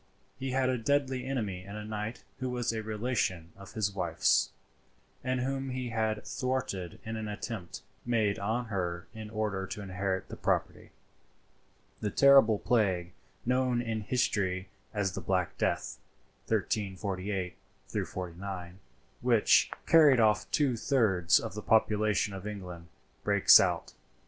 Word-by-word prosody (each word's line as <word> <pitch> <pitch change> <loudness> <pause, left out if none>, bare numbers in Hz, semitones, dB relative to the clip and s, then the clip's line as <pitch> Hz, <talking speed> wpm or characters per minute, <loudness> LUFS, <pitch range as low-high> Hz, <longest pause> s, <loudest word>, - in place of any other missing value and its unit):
He 135 0 -3
had 130 0 +1
a 130 -1 0
deadly 130 +1 0
enemy 105 -9 -2
in 100 +2 -9
a 105 0 -6
knight 105 +2 -5 0.2
who 130 -1 -2
was 120 -2 -1
a 110 - -2
relation 105 -6 -2
of 100 0 -12
his 110 -3 0
wife's, 85 -4 +2 0.7
and 130 0 0
whom 135 +1 -2
he 125 -1 -3
had 110 -2 -1
thwarted 125 - -3
in 110 0 -4
an 110 -1 -4
attempt 105 -3 -6 0.2
made 110 -4 +1
on 110 +5 -1
her 85 -2 -2
in 110 -1 -8
order 105 -3 -2
to - - -6
inherit 95 0 -2
the - - -7
property. - - -1 1.1
The 105 - -1
terrible 135 -4 +6
plague 95 -7 +1 0.3
known 125 0 +2
in 115 -2 -2
history 100 -5 0 0.2
as 100 -3 -1
the - - -5
Black 90 -2 0
Death 65 -1 -1 0.5
(1348 95 -2 -2 0.5
49), 90 0 -6 0.4
which 120 -3 +4 0.2
carried 150 -6 +6
off 105 -1 +3
two 140 -5 +2
thirds 105 - +3
of - - -5
the 105 - -5
population 105 -1 +2
of 95 +1 -6
England, 90 -5 -7 0.4
breaks - - +7
out. - - 0
105 Hz, 140 wpm, -30 LUFS, 95-125 Hz, 1.1 s, breaks